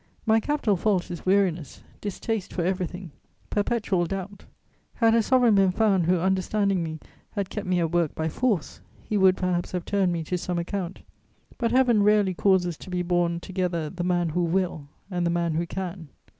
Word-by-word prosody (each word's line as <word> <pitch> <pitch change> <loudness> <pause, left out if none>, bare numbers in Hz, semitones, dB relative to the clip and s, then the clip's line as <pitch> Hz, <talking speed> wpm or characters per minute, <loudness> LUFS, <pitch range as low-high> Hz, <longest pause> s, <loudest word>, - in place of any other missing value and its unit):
My 220 0 +4
capital 260 -4 0
fault 185 -1 0
is 175 +1 -7
weariness, 180 -7 +1 0.2
distaste 210 0 -3
for 175 - -1
everything, 180 -1 -3 0.4
perpetual 205 -4 0
doubt. 195 +1 -6 0.5
Had 225 -2 +4
a 230 - +4
sovereign 245 0 +4
been 195 -2 +4
found 195 -4 +2
who, 180 +1 +3
understanding 190 +1 +1
me, 160 -1 -4 0.4
had 200 -3 -3
kept 210 -3 -4
me 180 -1 +2
at 165 -2 0
work 170 -3 +1
by 160 - -1
force, 190 - -1 0.2
he 215 - -3
would 190 -2 +5
perhaps 180 -1 -1
have 180 -1 -3
turned 195 -3 +1
me 170 -1 -2
to 180 +3 -2
some 175 0 -3
account: 180 +1 -4 0.6
but 235 - +1
Heaven 245 -4 +4
rarely 205 -2 +3
causes 180 -3 +2
to - - -11
be 180 -1 -1
born 175 -1 +1
together 175 -5 -2
the 180 -1 -4
man 175 -1 +1
who 175 +3 0
will 170 -4 -1 0.2
and 175 -1 -1
the 170 - +1
man 170 -1 0
who 170 +2 -1
can. 180 -2 -5
185 Hz, 185 wpm, -25 LUFS, 175-205 Hz, 0.6 s, would